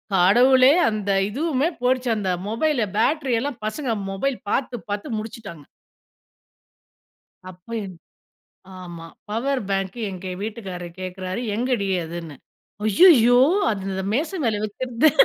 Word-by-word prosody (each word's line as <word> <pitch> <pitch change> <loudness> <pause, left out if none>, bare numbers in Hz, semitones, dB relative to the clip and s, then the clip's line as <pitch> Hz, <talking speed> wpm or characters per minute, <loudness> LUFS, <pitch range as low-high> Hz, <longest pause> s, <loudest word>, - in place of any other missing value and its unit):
கடவுளே 255 +9 +6 0.2
அந்த 210 -2 -3 0.2
இதுவுமே 290 +4 0
போய்டுச்சு 250 -1 +1
அந்த 195 -3 -1 0.2
மொபைல் 270 +4 +1 0.2
பேட்டரி 270 +2 +1
எல்லாம் 275 -3 -4
பசங்க 240 +2 -2 0.2
மொபைல் 255 +7 -1
பாத்து 255 +1 -1
பாத்து 205 +6 -3
முடிச்சுட்டாங்க. 215 -8 -9 1.9
அப்போ 180 +5 -14
என் 185 -2 -9 0.8
ஆமா 170 -2 -9 0.2
பவர் 260 +5 -1
பேங்க் 195 +2 -2
எங்க 185 0 -7
வீட்டுக்காரர் 190 -6 -6
கேட்கிறாரு 185 +2 -4
எங்கடி 240 -2 0 0.2
அதுன்னு 165 -2 -7 0.5
அய்யயோ 245 - +6 0.3
அந்த 195 -1 -4
மேசை 320 +9 -1
மேல 215 -3 0
வைக்கிறது 245 +7 +1
220 Hz, 110 wpm, -23 LUFS, 190-255 Hz, 1.9 s, கடவுளே